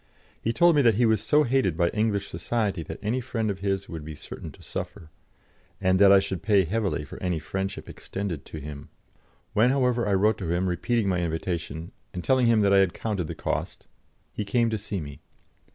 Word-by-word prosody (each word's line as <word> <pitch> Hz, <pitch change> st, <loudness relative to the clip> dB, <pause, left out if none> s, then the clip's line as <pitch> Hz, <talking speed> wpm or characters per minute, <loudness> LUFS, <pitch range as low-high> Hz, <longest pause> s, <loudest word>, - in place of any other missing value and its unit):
He 115 Hz, -, 0 dB
told 170 Hz, +6 st, +5 dB
me 145 Hz, -, +5 dB
that 115 Hz, -5 st, +4 dB
he 120 Hz, +3 st, +3 dB
was 110 Hz, -2 st, +3 dB
so 150 Hz, 0 st, +3 dB
hated 120 Hz, -, +1 dB
by 85 Hz, -1 st, +3 dB
English 105 Hz, -1 st, 0 dB
society 105 Hz, -7 st, -2 dB
that 80 Hz, 0 st, -7 dB
any 120 Hz, +5 st, 0 dB
friend 115 Hz, -4 st, -2 dB
of 95 Hz, -, -6 dB
his 100 Hz, 0 st, -1 dB
would 80 Hz, -2 st, -7 dB
be 75 Hz, 0 st, -7 dB
certain -, -, -9 dB
to -, -, -17 dB
suffer, 80 Hz, -1 st, -6 dB, 0.7 s
and 95 Hz, -1 st, +2 dB
that 100 Hz, -1 st, +8 dB
I 100 Hz, -, +8 dB
should 95 Hz, -2 st, -1 dB
pay 100 Hz, -2 st, +3 dB
heavily 100 Hz, -3 st, -1 dB
for 70 Hz, -, -10 dB
any 90 Hz, -2 st, 0 dB
friendship 95 Hz, +4 st, -4 dB
extended 95 Hz, -7 st, -5 dB
to -, -, -8 dB
him. 75 Hz, -1 st, -8 dB, 0.6 s
When, 110 Hz, +4 st, +4 dB
however, 125 Hz, -4 st, +2 dB
I 100 Hz, -, +2 dB
wrote 105 Hz, +3 st, +2 dB
to 90 Hz, -4 st, -3 dB
him, 90 Hz, +2 st, +1 dB
repeating 110 Hz, +5 st, 0 dB
my 90 Hz, -2 st, +1 dB
invitation, 80 Hz, -1 st, -3 dB, 0.2 s
and 90 Hz, -, -4 dB
telling 130 Hz, -2 st, +3 dB
him 115 Hz, -2 st, +4 dB
that 100 Hz, -1 st, +4 dB
I 100 Hz, -, +7 dB
had 95 Hz, -3 st, +2 dB
counted 100 Hz, -7 st, -2 dB
the -, -, -5 dB
cost, -, -, -3 dB, 0.5 s
he 105 Hz, -, -3 dB
came 115 Hz, +2 st, +1 dB
to 110 Hz, -, 0 dB
see 100 Hz, -1 st, -4 dB
me. 70 Hz, -1 st, -9 dB
100 Hz, 215 wpm, -26 LUFS, 90-115 Hz, 0.7 s, that